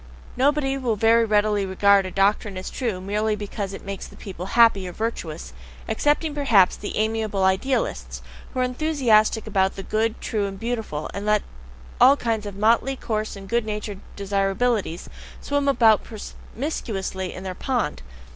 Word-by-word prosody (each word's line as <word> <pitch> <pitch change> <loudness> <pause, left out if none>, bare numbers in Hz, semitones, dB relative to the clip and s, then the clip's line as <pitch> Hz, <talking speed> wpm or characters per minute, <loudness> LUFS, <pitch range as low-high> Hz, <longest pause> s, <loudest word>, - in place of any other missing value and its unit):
Nobody 275 +1 +1
will 240 -4 0
very 225 +2 +4
readily 210 -1 +2
regard 195 0 +3
a - - -4
doctrine 200 0 +1
as 185 - -6
true 230 -8 -2
merely 210 +3 -1
because 205 -1 -5
it 195 - -9
makes 195 -1 -6
people 185 -2 -7
happy 225 -5 +5
or - - -5
virtuous 170 -8 -4 0.3
excepting, 295 +7 +1
perhaps, 235 -11 +4
the 205 - -5
amiable 215 -2 0
"Idealists," 190 +8 0 0.3
who 255 - -2
are - - +3
enthusiastic 250 -5 +2
about 195 -3 +1
the 195 - -6
good, 220 +2 -1
true, 210 -3 -1
and 195 -1 -7
beautiful, 225 -10 -3
and 200 +1 -5
let 210 -1 +3 0.6
all 275 +2 +8
kinds 225 -4 -2
of 200 - -7
motley, 230 +6 +2
coarse, 215 -4 -3
and 195 -1 -10
good 235 +3 +1
natured 210 -2 -5 0.2
desirabilities 200 -1 0 0.3
swim 285 0 -1
about 225 -6 +4
promiscuously 210 - -5
in 185 - -8
their 190 -1 -4
pond. 235 - -2
215 Hz, 155 wpm, -23 LUFS, 195-235 Hz, 0.6 s, all